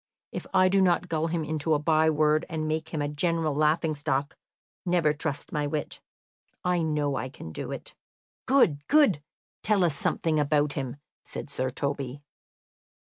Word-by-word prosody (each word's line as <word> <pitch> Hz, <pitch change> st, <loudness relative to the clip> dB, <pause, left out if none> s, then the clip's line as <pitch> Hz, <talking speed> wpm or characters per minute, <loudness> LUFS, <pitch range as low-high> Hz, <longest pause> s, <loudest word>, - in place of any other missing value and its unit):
If -, -, -6 dB
I 185 Hz, -1 st, +5 dB
do 195 Hz, +1 st, +3 dB
not 180 Hz, -1 st, +2 dB
gull 160 Hz, 0 st, 0 dB
him 165 Hz, -1 st, -1 dB
into 155 Hz, +1 st, 0 dB
a -, -, +3 dB
by 155 Hz, +1 st, +3 dB
word 155 Hz, +1 st, +3 dB
and 155 Hz, -2 st, -2 dB
make 160 Hz, 0 st, -2 dB
him 155 Hz, -3 st, -2 dB
a -, -, 0 dB
general 160 Hz, +1 st, 0 dB
laughing 155 Hz, +2 st, +2 dB
stock, 145 Hz, 0 st, -1 dB, 0.5 s
never 175 Hz, -4 st, +2 dB
trust 150 Hz, -1 st, -4 dB
my 150 Hz, -1 st, -1 dB
wit. 150 Hz, 0 st, -4 dB, 0.6 s
I 180 Hz, -1 st, +1 dB
know 150 Hz, -3 st, 0 dB
I 130 Hz, +3 st, -3 dB
can 80 Hz, -, -9 dB
do -, -, -5 dB
it." -, -, -7 dB, 0.5 s
"Good, 170 Hz, -, +3 dB
good! 285 Hz, -, +4 dB, 0.4 s
Tell 205 Hz, -3 st, +2 dB
us 165 Hz, -4 st, +2 dB
something 155 Hz, +2 st, 0 dB
about 145 Hz, 0 st, +2 dB
him," 130 Hz, -3 st, -3 dB, 0.3 s
said 145 Hz, -, -7 dB
Sir 130 Hz, -2 st, -1 dB
Toby. 140 Hz, 0 st, -3 dB
155 Hz, 170 wpm, -27 LUFS, 145-165 Hz, 0.6 s, I